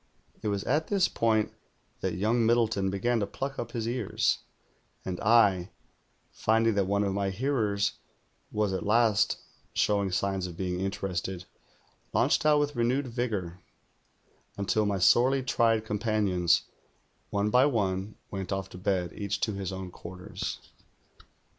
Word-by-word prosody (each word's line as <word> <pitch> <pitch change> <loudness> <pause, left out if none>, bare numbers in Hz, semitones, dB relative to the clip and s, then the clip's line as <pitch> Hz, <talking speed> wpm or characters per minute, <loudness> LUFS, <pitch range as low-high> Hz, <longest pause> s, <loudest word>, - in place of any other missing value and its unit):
It - - -3
was 100 -1 -1
at 155 +2 +1
this 195 -3 +3
])oint 110 -2 +1 0.5
that - - -2
young 110 +6 +1
Aliddleton 115 -4 +2
began 115 +5 0
to 100 - -1
pluck 135 +6 -5
up 120 0 -5
his 115 -2 -2
ears; 120 -3 0 0.7
and 90 -1 -3
I, 100 -5 +4 0.6
finding 115 +1 +2
that 100 -2 +1
one 100 +1 +1
of 100 -1 0
my 100 0 0
hearers 105 -2 0 0.5
was 105 -2 0
at 95 - -2
last 105 0 +3 0.4
showing 100 -2 +2
signs 95 0 -1
of 85 -2 -9
being 90 -1 -2
interested, 95 -1 -3 0.7
launched - - +3
out 150 -1 +6
with 145 0 -1
renewed 120 +2 0
vigoiu, 105 -8 -2 1.0
until 105 +1 +1
my 100 -1 0
sorely 130 +8 +4
tried 115 -3 +2
compan 105 0 0
ions, 90 -1 +3 0.7
one 105 +1 0
by 125 +4 +5
one, 100 -5 -1 0.2
went 95 -1 -4
off 95 -1 -2
to 90 - -10
bed, 90 -2 -1
each 100 0 -3
to 110 - 0
his 95 -2 -4
own 95 -1 -6
quarters. 90 +1 -6
105 Hz, 145 wpm, -28 LUFS, 95-115 Hz, 1.0 s, out